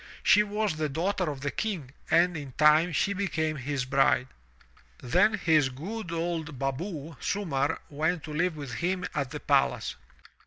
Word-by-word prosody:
She 210 Hz, -, +6 dB
was 210 Hz, -4 st, -1 dB
the 155 Hz, -1 st, -1 dB
daughter 180 Hz, +4 st, -1 dB
of 140 Hz, -3 st, -6 dB
the 140 Hz, 0 st, -2 dB
King 180 Hz, -12 st, -3 dB, 0.2 s
and 175 Hz, +1 st, +4 dB
in 140 Hz, -4 st, -6 dB
time 155 Hz, +4 st, +5 dB
she 195 Hz, +5 st, +1 dB
became 160 Hz, -6 st, -1 dB
his 135 Hz, -1 st, -2 dB
bride. 130 Hz, -1 st, +2 dB, 0.7 s
Then 180 Hz, -, +3 dB
his 160 Hz, -8 st, +3 dB
good 175 Hz, -, -6 dB
old 165 Hz, -3 st, -3 dB
baboo, 145 Hz, +3 st, -4 dB
Sumarr, 160 Hz, -7 st, 0 dB
went 160 Hz, +3 st, -1 dB
to 155 Hz, -, -7 dB
live 165 Hz, +1 st, 0 dB
with 140 Hz, -5 st, -6 dB
him 180 Hz, +3 st, -1 dB
at 140 Hz, -3 st, -1 dB
the -, -, -6 dB
palace. -, -, +1 dB
160 Hz, 160 wpm, -28 LUFS, 140-180 Hz, 0.7 s, She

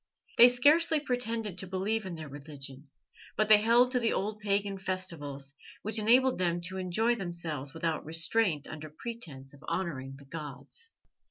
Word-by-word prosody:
They 240 Hz, -, +11 dB
scarcely 300 Hz, +6 st, +4 dB
pretended 230 Hz, -, -2 dB
to 190 Hz, -, -3 dB
believe 195 Hz, +3 st, -1 dB
in 175 Hz, -, -5 dB
their 155 Hz, -1 st, -7 dB
religion, 140 Hz, -1 st, -9 dB, 0.5 s
but 215 Hz, 0 st, +2 dB
they 215 Hz, -, +10 dB
held 240 Hz, +3 st, +4 dB
to 250 Hz, -, +2 dB
the 230 Hz, -2 st, +1 dB
old 210 Hz, +2 st, -2 dB
pagan 200 Hz, -1 st, -1 dB
festivals, 165 Hz, -8 st, -3 dB, 0.3 s
which 215 Hz, +1 st, 0 dB
enabled 250 Hz, +2 st, +4 dB
them 175 Hz, -1 st, +1 dB
to 190 Hz, -, -6 dB
enjoy 190 Hz, +6 st, +1 dB
themselves 170 Hz, -, -4 dB
without 165 Hz, -1 st, -2 dB
restraint 165 Hz, 0 st, +1 dB
under 155 Hz, 0 st, -8 dB
pretence 150 Hz, -, -8 dB
of 145 Hz, -, -16 dB
honouring 135 Hz, -7 st, -3 dB
the 140 Hz, -, -15 dB
gods. 150 Hz, -, -8 dB
185 Hz, 160 wpm, -30 LUFS, 150-225 Hz, 0.5 s, They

